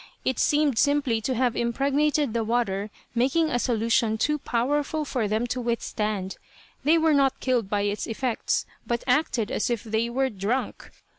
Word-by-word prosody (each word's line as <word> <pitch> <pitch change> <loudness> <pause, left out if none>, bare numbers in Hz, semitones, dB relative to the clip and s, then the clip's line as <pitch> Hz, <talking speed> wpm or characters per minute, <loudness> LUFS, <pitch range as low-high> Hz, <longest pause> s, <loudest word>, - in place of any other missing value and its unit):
It 260 - 0
seemed 295 -5 +2
simply 280 -6 +2
to 255 +4 -1
have 245 -1 +1
impregnated 275 +2 +1
the 230 -1 0
water, 215 -3 -1 0.2
making 275 +7 +2
a 245 - +1
solution 230 -2 +1
too 300 +6 +1
powerful 290 +6 -1
for 245 -6 -1
them 215 +3 0
to 250 - -4
withstand. 215 -4 -2 0.5
They 310 +4 +4
were 320 -1 +3
not 275 -2 +2
killed 245 -6 0
by 205 -1 0
its 205 +1 -2
effects, 235 +1 -1 0.2
but 235 0 -1
acted 250 -5 +1
as - - 0
if 235 -3 -1
they 225 +1 -1
were 265 +2 0
drunk. 215 +6 -3
240 Hz, 165 wpm, -25 LUFS, 220-275 Hz, 0.5 s, They